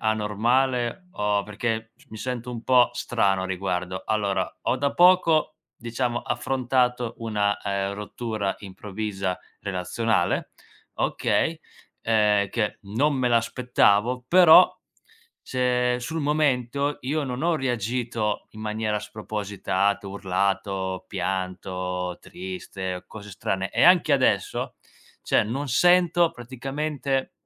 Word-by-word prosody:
anormale 120 Hz, -, 0 dB
o 105 Hz, -1 st, 0 dB
perché 110 Hz, +1 st, -3 dB, 0.2 s
mi 110 Hz, -, -10 dB
sento 125 Hz, +1 st, -4 dB
un 120 Hz, -1 st, -7 dB
po' 125 Hz, -2 st, +5 dB
strano 100 Hz, -6 st, 0 dB
a -, -, -2 dB
riguardo. 90 Hz, -1 st, -3 dB
Allora 100 Hz, -3 st, -1 dB
ho -, -, +1 dB
da 140 Hz, +1 st, 0 dB
poco, 175 Hz, -4 st, +4 dB, 0.2 s
diciamo 120 Hz, 0 st, -2 dB
affrontato 125 Hz, -2 st, 0 dB
una, 105 Hz, -3 st, 0 dB
ehm, 100 Hz, 0 st, -2 dB
rottura 105 Hz, -1 st, -3 dB
improvvisa, 100 Hz, -1 st, -4 dB, 0.2 s
relazionale, 100 Hz, +4 st, -1 dB, 0.4 s
okay, -, -, 0 dB, 0.4 s
ehm, 105 Hz, -3 st, +3 dB
che 105 Hz, -1 st, -2 dB
non 120 Hz, +9 st, 0 dB
me 130 Hz, -2 st, +1 dB
l'aspettavo. 120 Hz, 0 st, +2 dB
Però, 180 Hz, +1 st, +7 dB, 0.7 s
cioè 125 Hz, -1 st, +1 dB
sul 160 Hz, +7 st, -4 dB
momento 140 Hz, -2 st, 0 dB
io 150 Hz, +4 st, -1 dB
non 125 Hz, 0 st, -4 dB
ho 170 Hz, -1 st, +2 dB
reagito 120 Hz, -4 st, -2 dB
in 110 Hz, -, -11 dB
maniera 110 Hz, 0 st, -1 dB
spropositata, 100 Hz, -2 st, -2 dB
urlato, 95 Hz, -1 st, -2 dB
pianto, 90 Hz, -1 st, -3 dB
triste, 100 Hz, -, -6 dB
cose 105 Hz, -1 st, -10 dB
strane 95 Hz, 0 st, -2 dB
e -, -, +1 dB
anche 175 Hz, -3 st, +6 dB
adesso, 120 Hz, -8 st, +1 dB, 0.5 s
cioè -, -, +2 dB
non 135 Hz, +7 st, -3 dB
sento 175 Hz, +3 st, +4 dB
praticamente, 135 Hz, +1 st, -3 dB
115 Hz, 110 wpm, -25 LUFS, 100-130 Hz, 0.7 s, Però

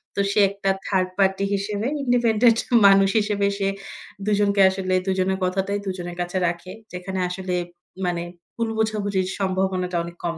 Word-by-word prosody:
তো -, -, -3 dB
সে 210 Hz, -, +1 dB
একটা 200 Hz, 0 st, -3 dB, 0.2 s
third 185 Hz, -2 st, +1 dB
party 195 Hz, 0 st, +2 dB
হিসেবে 205 Hz, +3 st, -2 dB, 0.2 s
ইন্ডিপেন্ডেন্ট 235 Hz, -2 st, +3 dB, 0.3 s
মানুষ 195 Hz, 0 st, +5 dB
হিসেবে 205 Hz, -1 st, 0 dB
সে 195 Hz, -1 st, 0 dB, 0.6 s
দুজনকে 205 Hz, -1 st, +2 dB
আসলে 190 Hz, -1 st, -2 dB
দুজনের 190 Hz, 0 st, +1 dB
কথাটাই 195 Hz, +2 st, -1 dB
দুজনের 175 Hz, -2 st, -5 dB
কাছে 175 Hz, +1 st, -3 dB
রাখে। 175 Hz, +2 st, -4 dB, 0.2 s
যেখানে 185 Hz, +1 st, -4 dB
আসলে 180 Hz, 0 st, -3 dB, 0.5 s
মানে 175 Hz, -1 st, -1 dB, 0.3 s
ভুল 230 Hz, -1 st, -1 dB
বোঝাবুঝির 205 Hz, -4 st, 0 dB
সম্ভাবনাটা 190 Hz, -1 st, -1 dB
অনেক 170 Hz, 0 st, -9 dB
কম 170 Hz, -1 st, -2 dB
195 Hz, 145 wpm, -23 LUFS, 185-205 Hz, 0.6 s, মানুষ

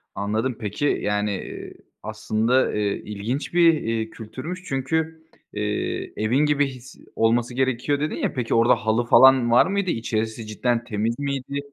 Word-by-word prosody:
Anladım, 110 Hz, +4 st, -2 dB
peki 110 Hz, +6 st, -3 dB, 0.2 s
yani, 105 Hz, 0 st, 0 dB, 0.3 s
ııı, -, -, -10 dB, 0.3 s
aslında, 110 Hz, +3 st, -1 dB
ııı, -, -, -3 dB, 0.3 s
ilginç 105 Hz, +10 st, -4 dB
bir, 165 Hz, -9 st, +3 dB
ııı, 110 Hz, -, -5 dB
kültürmüş 130 Hz, +13 st, -8 dB
çünkü, 135 Hz, 0 st, -2 dB, 0.6 s
ııı, 105 Hz, -, -2 dB, 0.5 s
evin 120 Hz, +8 st, +2 dB
gibi 145 Hz, -1 st, +2 dB
his, 130 Hz, -1 st, -11 dB, 0.2 s
olması 120 Hz, +2 st, +1 dB
gerekiyor 130 Hz, +2 st, 0 dB
dedin 150 Hz, +1 st, -2 dB
ya. -, -, -2 dB
Peki, 125 Hz, -4 st, -2 dB
orada 115 Hz, +1 st, +5 dB
halı 110 Hz, +2 st, 0 dB
falan 130 Hz, -1 st, +6 dB
var 120 Hz, -, +6 dB
mıydı? 200 Hz, -1 st, -1 dB
İçerisi 115 Hz, -1 st, -3 dB
cidden 120 Hz, +2 st, -1 dB
temiz 115 Hz, +1 st, -2 dB
miydi? 140 Hz, 0 st, -3 dB
120 Hz, 150 wpm, -23 LUFS, 110-140 Hz, 0.6 s, falan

